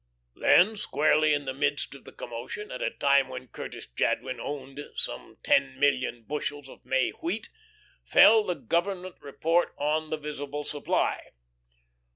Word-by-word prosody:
Then, 210 +5 +5
squarely 155 -4 +2
in 145 -1 +1
the 135 - -3
midst 145 +1 -1
of 140 - -14
the - - -11
commotion, 120 - -7
at 125 - -6
a - - +1
time 140 -1 +3
when 130 -1 -8
Curtis - - -8
Jadwin 125 - -1
owned 135 -1 -6 0.2
some - - -4
ten 135 -1 +2
million 130 -4 +1
bushels 145 +1 -4
of - - -14
May 130 0 +1
wheat, 185 +7 -4 0.5
fell 220 -1 +7
the 180 -3 -2
Government 180 - -2
report 165 +5 0
on 155 +2 0
the 155 - -1
visible 145 -1 -5
supply. 145 0 -1
145 Hz, 150 wpm, -28 LUFS, 135-155 Hz, 0.5 s, fell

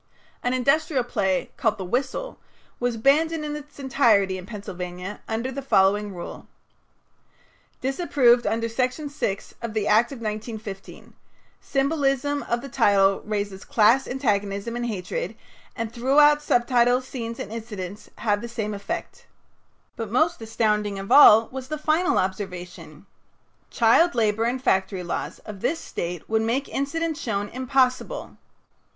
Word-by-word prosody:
An 245 +1 0
industrial 275 +1 +2
play 195 -6 -1
called 220 -2 +1
"The 190 - -5
Whistle" 260 - -2 0.4
was 245 -1 -1
banned 285 +7 +3
in 325 -2 -3
its 295 -1 -10
entirety 230 -8 +3
in 180 - -11
Pennsylvania 185 -2 -6
under 230 +4 -2
the 275 +2 -5
following 205 -5 +2
ruling: 175 - -8 1.3
"Disapproved 265 -3 +3
under 230 +1 0
Section 255 +5 -2
6 200 -8 -3
of 230 -2 -5
the 210 -1 0
Act 225 +5 +4
of 275 - -6
1915. 215 -2 -7 0.5
Symbolism 280 0 0
of 235 0 0
the 275 - -7
title 200 -6 +3
raises 205 -2 -3
class 230 +4 +3
antagonism 205 -3 -1
and 240 0 -2
hatred, 230 - -4 0.4
and 230 -1 -4
throughout 295 +4 +4
subtitles, 245 -1 +2
scenes, 230 -3 -5
and 205 - -6
incidents 210 -4 -7
have 205 -1 0
the 235 - -6
same 215 -2 -3
effect." 200 0 -6 0.7
But 225 -3 -5
most 315 +6 +1
astounding 210 -2 0
of 195 0 -6
all 225 -6 +8
was 260 0 -6
the 305 +2 -3
final 315 +4 +1
observation: 180 -4 -4 0.6
"Child 265 +9 +4
labor 220 -1 +1
and 250 +2 0
factory 190 -5 0
laws 175 - -4
of 205 -3 -8
this 325 - 0
State 175 - -5
would 220 0 +1
make 240 +5 0
incident 320 +3 -2
shown 205 -7 -2
impossible." 255 - 0
230 Hz, 140 wpm, -24 LUFS, 205-270 Hz, 1.3 s, all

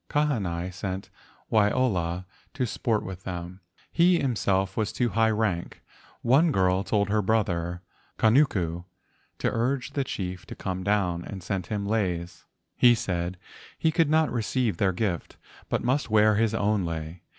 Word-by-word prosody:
Kahanai 95 - 0
sent 95 0 -5 0.4
Waiola 100 -6 +1 0.3
to 130 -2 0
sport 110 -1 -1
with 95 -1 -7
them. 90 0 -6 0.3
He 175 +1 +4
himself 95 - 0
was 110 -2 0
of - - -9
too 120 -1 +2
high 115 +1 +3
rank. 105 -6 -1 0.4
One 145 +7 +4
girl 95 -4 +2
told 100 -1 +1
her 105 +1 +2
brother 90 -4 0 0.3
Kanuku 100 - +2 0.5
to - - 0
urge 125 +3 -1
the 140 - 0
chief 90 -7 -5
to - - -8
come 95 0 -4
down, 90 -4 +1
and 95 -1 -8
sent 95 -1 -3
him 105 -2 -2
leis. 90 -5 -2 0.3
He 120 -1 +6
said 90 -3 -2 0.4
he 160 - +2
could 160 -1 +2
not 160 0 +3
receive 115 -3 0
their 95 0 +2
gift, 90 -2 -3 0.3
but - - 0
must 130 +2 0
wear 110 0 +5
his 110 +1 +1
own 105 -2 +1
lei. 80 0 -5
100 Hz, 155 wpm, -26 LUFS, 90-115 Hz, 0.5 s, He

